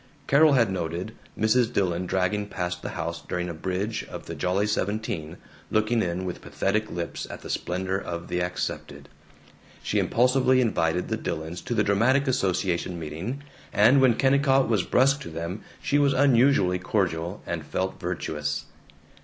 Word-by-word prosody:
Carol 150 +2 +5
had 115 -6 +3
noted 90 +3 -3 0.2
Mrs. 115 +2 +3
Dillon 90 -2 0
dragging 100 +3 0
past 90 -2 -3
the - - -5
house 85 0 -3
during 90 0 -3
a - - -4
bridge 95 +6 -3
of - - -9
the - - -6
Jolly 95 +3 0
Seventeen, 105 -6 -2 0.3
looking 110 +2 +2
in 90 0 -2
with 90 - -5
pathetic 110 +2 -1
lips 85 -1 -4
at - - -8
the - - -5
splendor 95 +2 -2
of 85 -3 -6
the 90 0 -1
accepted. 90 +1 -4 0.7
She - - 0
impulsively 130 +1 +3
invited 90 -8 +1
the - - 0
Dillons 80 +3 -4
to 120 - -3
the 105 - +3
dramatic 120 +8 +3
association 95 -7 0
meeting, 85 - -5 0.3
and 125 +7 +5
when 130 -3 +5
Kennicott 135 0 +3
was 110 -4 +2
brusque 135 +9 +3
to - - -7
them 85 +5 -5 0.2
she 145 - +2
was 140 -1 +3
unusually 125 -9 +4
cordial, 90 -2 -1
and 85 -2 -3
felt 95 +5 -3
virtuous. 75 -4 -3
95 Hz, 160 wpm, -26 LUFS, 90-120 Hz, 0.7 s, Carol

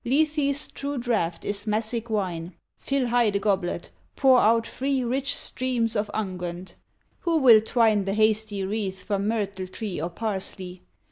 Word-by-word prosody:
Lethe's 295 +1 +1
true 280 0 -5
draught 215 -9 -1
is 205 +1 -2
Massic 220 +2 0
wine; 180 -5 -3 0.2
Fill 275 -3 -1
high 240 -2 +3
the 200 - 0
goblet; 195 -4 -1 0.2
pour 260 -2 +5
out 230 +1 +3
free 270 +1 -1
Rich 265 +3 0
streams 240 -3 -1
of 210 0 -1
unguent. 180 -3 -5 0.5
Who 335 -2 +1
will 240 -7 +7
twine 220 -3 +2
The 195 +1 -1
hasty 215 -2 +1
wreath 190 -2 -3
from 200 0 -1
myrtle 200 -4 -2
tree 195 -4 -5
Or 170 - -2
parsley? 190 -2 -4
215 Hz, 150 wpm, -25 LUFS, 195-245 Hz, 0.5 s, will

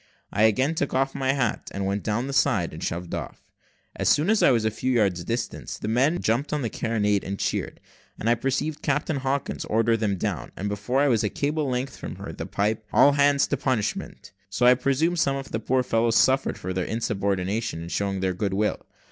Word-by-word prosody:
I 105 - +4
again 130 +8 +2
took 145 -4 -2
off 135 +1 +1
my 135 0 0
hat, 125 -6 -1
and 100 0 -2
went 100 +1 -1
down 115 +5 -1
the 140 - -4
side, 110 - +2
and 80 - -7
shoved 85 0 -4
off. - - -6 0.5
As - - +1
soon 160 +8 +3
as 220 - +3
I - - +6
was 115 -4 +2
a 110 - +2
few 130 +4 -2
yards 95 -7 +1
distant, 115 +6 -4
the - - -4
men 135 +10 +2
jumped 120 +6 0
on 150 -2 -1
the 115 - -2
carronade, 105 -3 0
and 100 +1 -4
cheered, - - -2 0.4
and 110 - -4
I 120 - +5
perceived 135 +5 -2
Captain 145 +1 0
Hawkins 135 +1 -2
order 115 +1 +2
them 105 -3 0
down, - - -3
and 100 +2 -2
before 105 +7 0
I 145 - +4
was 115 -4 +2
a 105 - +1
cable's 145 +1 -1
length 125 +2 -3
from - - -7
her, - - -7
the - - -6
pipe 105 +2 -1
"All 145 - +6
hands 140 0 +3
to 145 - 0
punishment;" 115 -6 -2 0.2
so 100 +5 0
I 125 - +8
presume 140 +7 +1
some 140 -4 +2
of 135 0 -6
the 110 - -1
poor 130 +3 +1
fellows 115 -1 +1
suffered 130 +3 +3
for 95 - -4
their 90 0 -1
insubordination 100 -3 -2
in 85 - -7
showing 100 0 -1
their 95 -1 0
good 95 +1 -2
will. 105 +1 -1
115 Hz, 225 wpm, -25 LUFS, 105-135 Hz, 0.5 s, I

